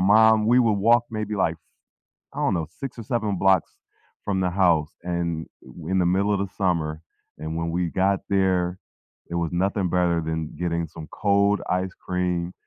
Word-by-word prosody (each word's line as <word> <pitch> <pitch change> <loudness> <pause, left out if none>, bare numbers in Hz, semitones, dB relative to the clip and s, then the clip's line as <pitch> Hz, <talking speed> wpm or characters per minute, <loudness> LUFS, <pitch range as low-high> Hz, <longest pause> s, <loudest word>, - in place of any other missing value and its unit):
mom 110 +2 +5
we 120 +3 +5
would 115 -3 +4 0.2
walk 120 0 +6
maybe, 110 -1 -3
like, 85 -5 0 0.8
I - - -4
don't - - +2
know, 80 -3 -1 0.2
6 135 -3 -5
or - - -5
7 110 -3 -1
blocks 95 -2 +3 0.5
from 95 -2 0
the 90 -1 +1
house, 80 -3 +3 0.2
and 85 -2 -2 0.2
i - - -19 0.2
in 95 - +2
the - - +2
middle 100 +2 +1
of 100 - -1
the - - -7
summer. 85 -5 +1 0.5
And 80 +1 -4
when 85 0 -2
we 90 +2 -1 0.2
got 100 0 +3
there, 95 -2 +1 0.5
it - - -5
was 85 - -3
nothing 95 +2 0
better 85 -1 +2
than 80 -1 -3
getting 85 -1 -1
some 80 0 -10 0.2
cold 100 0 +3 0.2
ice 95 0 -4
cream. 90 -1 -1
95 Hz, 185 wpm, -24 LUFS, 85-100 Hz, 0.8 s, walk